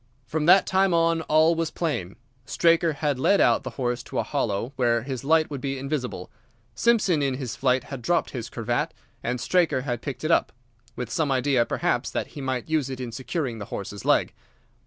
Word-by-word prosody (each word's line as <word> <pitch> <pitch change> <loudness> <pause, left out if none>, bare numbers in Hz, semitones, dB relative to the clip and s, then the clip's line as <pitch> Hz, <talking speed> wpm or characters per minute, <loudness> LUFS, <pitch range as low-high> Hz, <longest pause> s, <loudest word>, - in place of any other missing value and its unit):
"From 150 +5 -2
that 185 +2 +7
time 190 -1 +2
on 165 0 +2
all 160 +1 +4
was 165 -1 -1
plain. 140 - -3 0.3
Straker 165 -1 +3
had 145 -2 -1
led 200 +9 +3
out - - +4
the - - -5
horse 125 -2 -1
to - - -6
a - - +2
hollow 120 -3 -2
where 120 -3 +1
his 130 -2 -5
light 155 +2 +3
would 140 -3 -5
be 135 0 -2
invisible. 130 -8 -4 0.4
Simpson 215 -9 +2
in 135 -2 0
his 130 -3 -5
flight 130 -1 +1
had 135 -3 -7
dropped 170 +7 0
his 115 -3 -5
cravat, 115 -2 -2 0.3
and 125 +1 -2
Straker 145 +3 +2
had 120 -3 -3
picked 140 0 -6
it 155 - +1
up—with 120 -3 -3
some 155 -4 0
idea, 130 -2 +2
perhaps, - - 0
that - - -3
he 145 - -8
might 130 -2 -2
use 155 -4 0
it 130 -1 -5
in 125 -2 -5
securing 130 0 -3
the 100 - -5
horse's 100 0 -6
leg. - - +2
135 Hz, 200 wpm, -25 LUFS, 120-160 Hz, 0.4 s, that